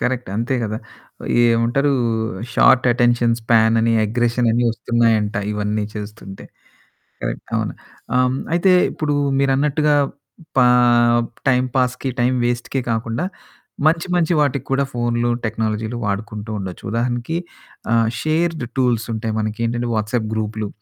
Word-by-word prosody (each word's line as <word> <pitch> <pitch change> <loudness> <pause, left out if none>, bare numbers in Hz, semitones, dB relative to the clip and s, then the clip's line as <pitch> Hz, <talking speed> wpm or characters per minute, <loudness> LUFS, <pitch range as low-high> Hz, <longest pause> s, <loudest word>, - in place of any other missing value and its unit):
Correct. 125 -3 -2
అంతే 120 +4 -1
కదా! 110 +1 -3 0.6
ఏమంటారు 120 +5 +2 0.6
షార్ట్ 130 0 +5
అటెన్షన్ 120 -1 +2
స్పాన్ 115 -1 +3
అని 115 0 +2
అగ్రెషన్ 120 +2 +1
అని 120 +2 +1
వస్తున్నాయంట. 115 -2 +1 0.2
ఇవన్నీ 105 0 -1
చేస్తుంటే. 105 -2 -8 0.8
కరెక్ట్. - - -4
అవును. - - -2 0.4
ఆహ్. 125 0 +2 0.2
అయితే 185 +2 +4 0.2
ఇప్పుడు 150 -2 -1 0.3
మీరన్నట్టుగా 145 +2 +2 0.6
పా 125 - +6 0.8
టైం 125 -1 +3
పాాస్‌కి, 125 +1 0
టైమ్ 125 +1 +2
వేస్ట్‌కె 120 +2 -2
కాకుండా 115 +6 -2 0.6
మంచి 165 +2 +2
మంచి 175 -1 +2
వాటికి 140 -3 0
కూడా 135 +1 +2
ఫోన్లు, 120 0 0
టెక్నాలజీలు 110 +1 -2
వాడుకుంటూ 105 +1 -4
ఉండొచ్చు. 95 -2 -7
ఉదాహరణకి 120 +6 -1 0.6
ఆహ్, 115 -1 +3
షేర్డ్ 160 -2 0
టూల్స్ 120 -3 +1
ఉంటాయి. 110 0 -3
మనకేంటంటే 115 +3 -2
వాట్సాప్ 110 +1 -1
గ్రూప్లు. 110 -1 -3
120 Hz, 120 wpm, -20 LUFS, 110-130 Hz, 0.8 s, పా